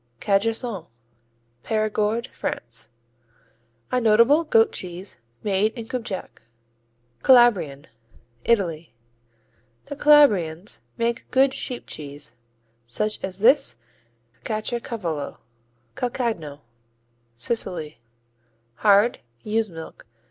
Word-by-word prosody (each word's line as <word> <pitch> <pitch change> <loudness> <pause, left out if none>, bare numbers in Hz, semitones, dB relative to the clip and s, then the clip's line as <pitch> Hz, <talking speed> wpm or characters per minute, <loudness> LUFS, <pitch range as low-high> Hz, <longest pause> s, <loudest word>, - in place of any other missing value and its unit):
Cajassou 205 -2 0 0.8
Périgord, 215 +1 0
France 115 -1 -5 1.0
A 250 - +1
notable 235 +8 +5
goat 225 -8 +4
cheese 180 +1 -5 0.2
made 205 +2 +1
in 230 -3 -7
Cubjac. 225 -5 -5 0.8
Calabrian 205 - +5 0.6
Italy 170 - 0 0.9
The 285 - -6
Calabrians 210 - +4 0.2
make 235 +1 -2
good 265 0 +3
sheep 250 -2 -3
cheese, 145 -5 -6 0.5
such 215 - -1
as 190 -1 -3
this 255 - +4 0.6
and 120 - -35
Caciocavallo. 215 - -3 0.6
Calcagno 220 - -3 0.7
Sicily 155 - -2 0.8
Hard; 205 +3 +4 0.2
ewe's 220 0 0
milk. 160 -7 -10
215 Hz, 85 wpm, -24 LUFS, 165-235 Hz, 1.0 s, notable